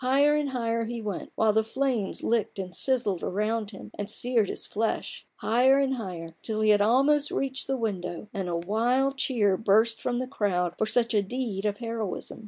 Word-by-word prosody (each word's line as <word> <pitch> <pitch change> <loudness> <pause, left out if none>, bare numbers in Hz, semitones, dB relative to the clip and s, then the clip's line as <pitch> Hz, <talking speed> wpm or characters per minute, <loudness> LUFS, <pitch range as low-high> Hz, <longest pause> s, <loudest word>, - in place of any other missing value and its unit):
Higher 275 +3 +4
and 295 -2 0
higher 230 -3 -1
he 235 +1 -4
went, 210 -4 -5
while 220 -1 +3
the 220 +1 +3
flames 240 -3 -1
licked 230 -2 0
and 185 -2 -5
sizzled 240 -8 0
around 215 +2 -1
him 195 - -11
and 205 0 -3
seared 230 -2 +1
his - - -1
flesh: 220 +2 -3
higher 255 +4 +3
and 275 -1 +2
higher 180 -9 -6
till 215 -1 -2
he 215 0 +5
had 205 -1 +4
almost 275 +7 +3
reached 270 0 -1
the 270 0 0
window, 200 -4 -3
and 190 -4 -3
a 170 - -1
wild 240 +9 +1
cheer 210 -8 +2
burst 220 +2 +3
from 245 -1 -1
the 255 - -1
crowd 185 -9 -1
for 220 - +1
such 230 +1 +2
a 210 - +4
deed 210 -2 -3
of 205 -1 -2
heroism. 225 -4 -4
225 Hz, 195 wpm, -27 LUFS, 205-255 Hz, -, he